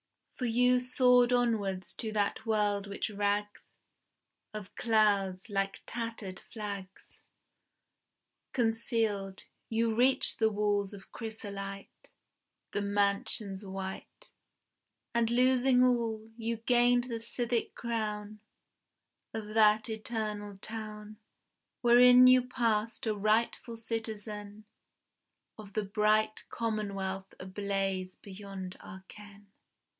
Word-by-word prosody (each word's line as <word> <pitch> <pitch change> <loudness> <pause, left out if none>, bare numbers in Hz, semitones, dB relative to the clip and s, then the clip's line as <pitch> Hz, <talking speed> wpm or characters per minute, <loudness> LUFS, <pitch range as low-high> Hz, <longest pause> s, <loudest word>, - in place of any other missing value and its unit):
For 250 - -3
you 250 +2 +3
soared 250 -1 +4
onwards 205 -7 0
to 220 - -3
that 210 +1 -1
world 205 -2 +1
which 200 +2 -3
rags 205 0 -2 0.9
Of 205 -2 -7
clouds, 205 -3 +1
like 195 0 -1
tattered 225 -5 -5
flags, 200 -3 -8 1.3
Concealed; 225 -5 0 0.3
you 225 0 +1
reached 255 +4 +3
the 220 -1 +4
walls 205 -1 0
of 195 - -15
chrysolite, 200 -3 -7 0.6
The 205 - 0
mansions 200 0 -1
white; 190 - -7 0.8
And 235 -1 +2
losing 250 +1 +4
all, 225 -3 0
you 230 0 -3
gained 245 +1 +3
the 235 -2 -4
civic 235 0 -1
crown 215 -2 -3 1.0
Of 215 -1 -5
that 215 0 +4
eternal 215 -2 -4
town, 215 0 -7 0.6
Wherein 245 +1 +8
you 255 0 +7
passed 230 -1 0
a 220 - +1
rightful 220 +3 0
citizen 215 -2 -5 0.9
Of 205 -2 -11
the 215 - 0
bright 215 +1 +1
commonwealth 195 -4 -3
ablaze 195 -1 -2
beyond 195 -2 -8
our 190 +1 -11
ken. 205 -1 -14
215 Hz, 100 wpm, -31 LUFS, 200-230 Hz, 1.3 s, Wherein